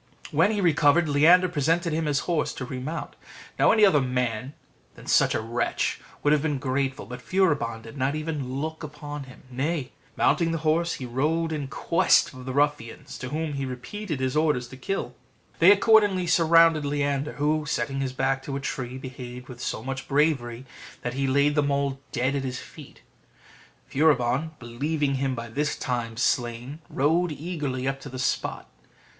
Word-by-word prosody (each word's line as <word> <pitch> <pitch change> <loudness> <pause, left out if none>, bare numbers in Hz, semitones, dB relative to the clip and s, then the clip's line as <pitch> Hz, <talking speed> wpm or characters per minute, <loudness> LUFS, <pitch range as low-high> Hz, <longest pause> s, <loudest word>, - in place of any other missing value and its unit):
When - - +4
he 210 -2 0
recovered, 165 -1 +4
Leander 165 +6 +5
presented 165 +1 0
him 160 0 -1
his 145 -1 +1
horse 165 -4 -1
to 130 - -5
remount. 130 +6 -5 0.4
Now, - - +6
any 215 -2 +6
other 160 -7 +5
than 125 - -4
such - - +3
a - - 0
wretch 115 +2 -1 0.2
would 145 - +4
have 150 - +3
been 150 -2 0
grateful: 135 -2 -2
but 125 +3 -8
Furibon 145 -13 0
did 115 +5 -11
not 135 +2 0
even 155 -4 -3
look 160 +2 -4
upon 145 -1 -7
him: 130 - -15
nay, 135 +1 -2 0.3
mounting 170 -2 +3
the 165 - -1
horse, 170 +2 +2
he 130 - -6
rode 155 +7 0
in 145 -3 -3
quest 165 +3 +2
of 130 0 -10
the 130 - -4
ruffians, 145 -4 -1
to 130 - -5
whom 155 +1 -2
he 140 -1 -3
repeated 155 +6 -5
his 130 +1 -1
orders 150 -6 +1
to 130 - -10
kill 195 +10 -2
him. 125 - -15 0.5
They 170 +4 +8
accordingly 205 -3 +4
surrounded 165 -2 +5
Leander, 145 0 -1
who, 150 +1 0
setting 135 +2 -1
his 135 -1 -1
back 135 +1 0
to 135 +1 -5
a - - -2
tree, 130 -2 -4
behaved 125 -1 -8
with 120 -1 -9
so 110 - -3
much 135 +1 -5
bravery, 135 -4 +1 0.4
that 120 - -2
he 135 +1 -1
laid 140 +2 +3
them 145 -1 +1
all 140 -1 0
dead 130 +3 0
at 140 - -1
his 130 -1 -3
feet. - - -12 0.8
Furibon, 140 0 +2
believing 140 +5 -2
him 135 -1 0
by 115 0 -5
this 150 +5 -1
time 120 -3 -3
slain, 125 +3 -1
rode 160 +5 +1
eagerly 150 -5 -3
up 135 0 -2
to 140 - -8
the 130 - -7
spot. 125 - -2
140 Hz, 180 wpm, -26 LUFS, 130-155 Hz, 0.8 s, They